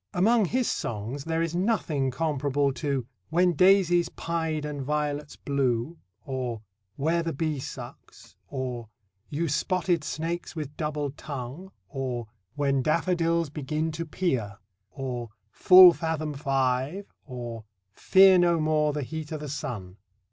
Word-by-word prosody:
Among 215 +4 +4
his 245 +6 0
songs 120 +6 -3
there 165 0 0
is 165 -1 -2
nothing 175 - 0
comparable 145 -1 0
to 135 -1 -2 0.2
"When 175 +2 +3
daisies 175 0 +4
pied 160 -2 -2
and 145 -1 -4
violets 150 +1 -2
blue," 140 +2 -1 0.3
or 125 -5 -4 0.3
"Where 165 +4 +1
the 165 0 -3
bee 155 0 -1
sucks," - - -10
or 125 -5 -5 0.4
"You 165 +3 -1
spotted 175 +2 0
snakes 165 +3 -4
with 150 -2 -5
double 150 -2 -2
tongue," 140 +6 -7 0.2
or 125 +1 -4 0.3
"When 140 -2 +1
daffodils 165 +1 +1
begin 155 +2 -2
to 165 +1 -5
peer," 125 - -1 0.3
or 125 -4 -5 0.2
"Full 180 +8 +9
fathom 160 -3 -2
five," 135 +5 0 0.2
or 120 -4 -6 0.3
"Fear 190 - +6
no 170 -1 +3
more 155 -1 +2
the 150 -1 -2
heat 160 +3 -6
o' 155 - -2
the 150 -1 -7
sun." 105 -9 -5
150 Hz, 135 wpm, -27 LUFS, 135-170 Hz, 0.4 s, Full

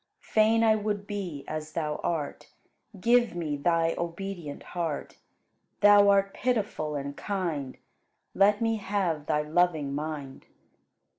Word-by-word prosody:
Fain 220 +1 +3
I 220 -1 +5
would 205 -1 -2
be 185 -9 -5
as 155 0 -5
Thou 150 -2 -2
art: 160 -4 -3 0.5
Give 235 -1 +3
me 160 -4 -2
Thy 165 +2 +1
obedient 170 -3 -5
heart. 165 -4 -3 0.6
Thou 205 0 +7
art 195 0 +3
pitiful 210 -11 -1
and 140 0 -4
kind: 165 -10 -3 0.6
Let 205 +2 +4
me 225 0 +1
have 185 -7 -1
Thy 150 -1 +1
loving 155 -3 +1
mind. 145 -2 -5
175 Hz, 125 wpm, -28 LUFS, 150-205 Hz, 0.6 s, Thou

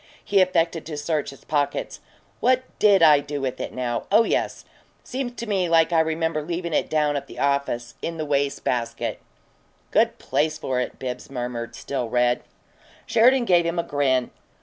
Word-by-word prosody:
He 200 -1 +4
affected 170 -3 +1
to 155 -2 -5
search 150 0 -1
his 135 - -13
pockets. 145 -2 -1 0.4
"What 255 0 +3 0.2
DID 200 -4 +5
I 150 -3 +7
do 145 0 -5
with 130 -2 -3
it, - - -4
now? 120 -2 -3
Oh 215 +3 +6
yes! - - -1 0.4
Seems 255 -2 -4
to 235 - -6
me 190 -5 0
like 165 0 +4
I 165 - +5
remember 160 0 0
leavin' 170 +1 -4
it - - +1
down 150 -1 +1
at 140 -1 -3
the - - -12
office 140 -4 -1
in 165 0 -4
the 155 - -3
waste 140 -1 0
basket." 115 -1 -2 0.7
"Good - - +3
place 150 +3 0
for 130 -5 -2
it," 125 - -3
Bibbs 125 -1 -6
murmured, 120 -2 -5
still 125 -1 -4
red. 120 +1 +2 0.6
Sheridan 245 +2 +4
gave 175 -4 +4
him 170 +1 -2
a 170 - +1
grin. 135 -4 0
150 Hz, 180 wpm, -24 LUFS, 130-170 Hz, 0.7 s, I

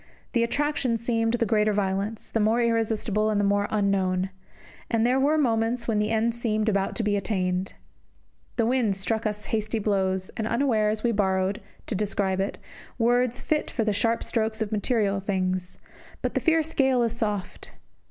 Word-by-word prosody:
The 235 - +3
attraction 265 -1 0
seemed 230 0 0
the 235 -1 +1
greater 215 0 +2
violence, 200 +2 -2
the 225 - 0
more 220 +2 +3
irresistible, 220 -2 +1
and 210 -1 +1
the - - +2
more 200 0 +2
unknown. 190 -2 +1 0.6
And 230 -1 +2
there 255 +2 +3
were 295 +3 +3
moments 235 -3 +1
when 220 -3 +1
the 210 0 +1
end 225 +1 +1
seemed 220 -2 -1
about 195 -2 +1
to 230 - -1
be 210 -1 +1
attained. 185 -2 -1 0.8
The 230 - +2
wind 235 -4 +2
struck 215 +4 -1
us 210 0 -4
hasty 215 +1 0
blows, 190 -3 0
and 220 - -4
unawares 220 -4 +1
we 240 - +3
borrowed, 195 0 0 0.2
to - - -3
describe 195 -1 0
it, 195 +1 -1 0.4
words 245 +1 +2
fit 305 -1 0
for 230 - -1
the 215 -1 +1
sharp 230 +3 +1
strokes 220 -1 -1
of 220 -1 -2
material 210 -2 +1
things; 185 -2 -2 0.5
but - - -1
the - - +1
fierce 325 -1 +2
gale 265 -3 +3
is 230 -1 0
soft. 210 -5 -3
215 Hz, 175 wpm, -26 LUFS, 200-235 Hz, 0.8 s, The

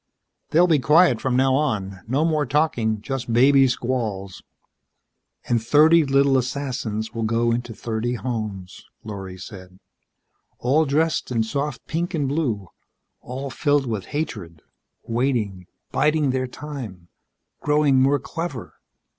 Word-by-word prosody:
"They'll 170 +3 +5
be 160 -4 +3
quiet 150 -3 +4
from 130 -2 0
now 130 +1 +3
on. 105 -10 -1
No 140 +7 +1
more 155 -4 +1
talking 120 -8 +1
just 130 -1 -4
baby 135 +3 +5
squalls." 115 -6 -3 1.1
"And 120 -2 +1
thirty 155 +6 +5
little 135 -1 +3
assassins 125 -4 -3
will 115 - -4
go 115 +1 +1
into 120 -1 -3
thirty 115 +2 -2
homes," 110 -5 -5 0.2
Lorry 95 -3 -7
said. 95 -1 -11 0.8
"All 145 +6 +2
dressed 155 +3 0
in 115 -3 +1
soft 140 +3 -3
pink 175 +3 -2
and 145 -4 0
blue, 125 - -2 0.5
all 135 +2 -6
filled 145 0 +1
with 110 -6 -3
hatred. 95 - -5 0.4
Waiting, 115 -7 -1 0.2
biding 150 -2 +2
their 130 0 -1
time, 125 - -8 0.5
growing 150 -3 +3
more 140 +2 +4
clever." 165 -2 -6
130 Hz, 130 wpm, -23 LUFS, 110-145 Hz, 1.1 s, They'll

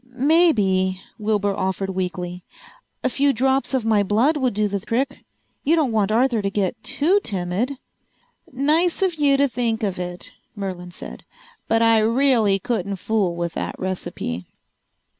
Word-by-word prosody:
"Maybe," 215 - +3 0.2
Wilbur 205 -2 0
offered 190 0 -2
weakly, 180 -1 -4 0.6
"a - - +3
few 280 +2 +2
drops 265 +2 +1
of 250 -4 -1
my 215 -2 +3
blood 220 +10 +2
would 260 -7 0
do 210 0 +2
the 200 0 -2
trick. 250 +7 -2 0.4
You 315 +4 +3
don't 300 -7 +1
want 215 -2 +1
Arthur 235 0 +2
to 200 - -1
get 200 +2 -2
too 290 +10 +2
timid." 195 +7 -1 0.7
"Nice 320 +8 +2
of 375 -2 +2
you 290 -3 +3
to 280 +1 +3
think 235 -2 -1
of 195 -3 -1
it," 180 0 -5 0.2
Merlin 185 -3 -5
said. 175 - -9 0.4
"But 225 0 +3
I 225 -1 +5
really 230 -3 +3
couldn't 200 -2 -2
fool 195 -2 0
with 170 -1 -3
that - - -4
recipe." 175 - -4
220 Hz, 155 wpm, -22 LUFS, 190-265 Hz, 0.7 s, I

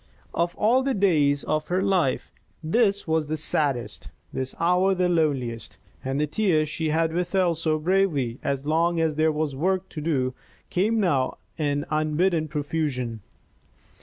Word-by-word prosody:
Of 170 +1 0
all 235 +5 +3
the 270 0 0
days 150 -8 +3
of 155 0 -1
her 185 +2 0
life 185 -9 +1 0.3
this 200 +3 +1
was 160 -1 +1
the 155 +1 -2
saddest, 145 -5 -1 0.2
this 130 0 -4
hour 180 +3 +3
the 180 -1 +2
loneliest, 140 -9 0 0.3
and 135 +2 -2
the 150 - +2
tears 155 -2 +1
she 155 +1 -2
had 160 +1 +1
withheld 175 -1 +1
so 155 -1 +1
bravely 155 -8 +1
as 140 0 -2
long 165 +2 +2
as 160 -1 +1
there 155 +1 +2
was 150 -2 -2
work 185 +5 0
to 155 - -6
do 135 -5 0 0.4
came 215 +5 +1
now 140 -10 +1 0.2
in 145 -1 -1
unbidden 155 +2 +1
profusion. 145 -6 -2
160 Hz, 155 wpm, -25 LUFS, 145-180 Hz, 0.4 s, all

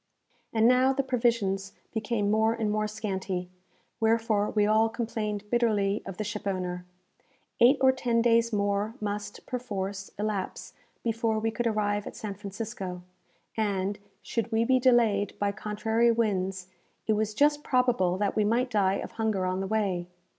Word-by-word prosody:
And 225 0 +4
now 255 +2 +5
the 275 +1 0
provisions 230 -6 0 0.2
became 215 -2 0
more 220 +1 +3
and 220 -2 -1
more 215 0 0
scanty, 190 -4 -4 0.5
wherefore 225 -2 +2
we 210 -1 +2
all 220 +1 +4
complained 220 -3 -3
bitterly 215 -4 +2
of 195 -2 -6
the 215 - -2
shipowner. 185 -4 -3 0.7
Eight 250 +4 +6
or 265 0 +7
ten 245 -3 0
days 230 0 +3
more 205 +1 0
must, 205 0 -4
perforce, 200 -6 -4
elapse 205 -2 -3 0.3
before 225 -1 0
we 225 +1 0
could 235 +2 -1
arrive 205 -2 0
at - - -8
San 210 -2 -5
Francisco; 195 -2 -6 0.5
and, 205 -2 -1 0.2
should 230 0 -2
we 225 +1 +2
be 255 +1 +4
delayed 230 -5 +3
by 205 0 0
contrary 220 +3 +1
winds, 190 -5 -1 0.4
it 220 - +2
was 215 0 -1
just 295 +2 +3
probable 245 -9 +2
that 205 0 0
we 215 - +3
might 240 +4 +1
die 195 -2 +2
of - - -5
hunger 215 -4 -1
on 185 0 -1
the 195 - -2
way. 190 -5 0
215 Hz, 155 wpm, -28 LUFS, 200-230 Hz, 0.7 s, or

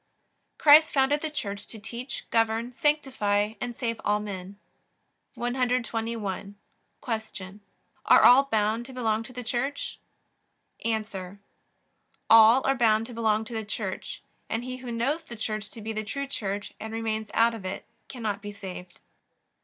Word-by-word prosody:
Christ 310 +1 +7
founded 280 +2 +3
the 315 - -2
Church 205 -9 -5
to 225 - -8
teach, 235 +5 -6
govern, 225 +1 +1
sanctify, 245 -8 +1
and 240 0 -3
save 230 -2 -3
all 210 0 +2
men. 200 -2 -7 0.8
121. 230 -5 -2 0.5
Q. 215 -5 -5 0.5
Are - - +7
all 265 +3 +8
bound 220 -1 0
to 265 - -10
belong 225 -3 0
to 230 - -9
the 250 0 -6
Church? 255 +5 -2 0.8
A. 220 -1 0 1.3
All 225 +3 +8
are 270 - +4
bound 225 -3 +3
to 245 - -9
belong 220 -1 +1
to 235 - -9
the 220 -1 -2
Church, 210 - -5 0.3
and 225 +2 -2
he 255 0 -5
who 250 -1 -7
knows 265 +8 0
the 240 -7 -10
Church 215 -1 -3
to 225 - -8
be 220 +1 -4
the 215 0 -2
true 280 +7 -4
Church 205 -6 -4
and 220 +1 -6
remains 220 -1 -2
out 230 +1 +4
of 225 -4 -7
it 185 0 -5 0.2
cannot 215 -5 -3
be 205 0 -6
saved. 185 -3 -9
225 Hz, 155 wpm, -27 LUFS, 210-250 Hz, 1.3 s, all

